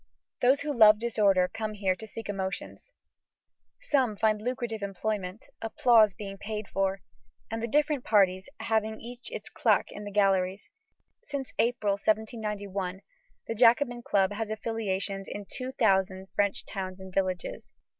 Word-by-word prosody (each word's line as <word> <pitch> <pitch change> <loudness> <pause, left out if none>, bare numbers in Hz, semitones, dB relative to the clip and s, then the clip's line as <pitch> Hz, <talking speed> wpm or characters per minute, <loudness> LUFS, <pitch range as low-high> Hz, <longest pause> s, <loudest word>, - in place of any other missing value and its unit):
Those 260 +3 +4
who 295 0 -2
love 215 -2 +8
disorder 205 -5 +3
come 215 +1 -4
here 195 -2 +1
to 220 +4 -9
seek 225 -1 -8
emotions. 195 - -5 0.9
Some 255 -8 +1
find 215 -1 +2
lucrative 240 -2 -3
employment, 200 0 -3 0.2
applause 225 -3 +4
being 195 -2 -7
paid 210 0 -5
for, 195 -1 -1 0.5
and 225 0 -2
the 235 - -1
different 295 +1 +1
parties 190 -1 +3
having 220 -1 0
each 245 - -9
its 485 - -6
claque - - +2
in 210 - -8
the 205 - -5
galleries. 195 -1 +1 0.5
Since 280 -3 -5
April, 230 -3 +2
1791, 205 -4 -2 0.4
the - - -3
Jacobin 240 +2 +4
Club 195 -4 +2
has 220 +1 -3
affiliations 200 -3 -2
in 205 - -6
two 255 0 -5
thousand 190 -4 +1
French 200 -1 0
towns 190 -2 -5
and 190 -1 -10
villages. 185 -2 -2
210 Hz, 145 wpm, -28 LUFS, 195-230 Hz, 0.9 s, love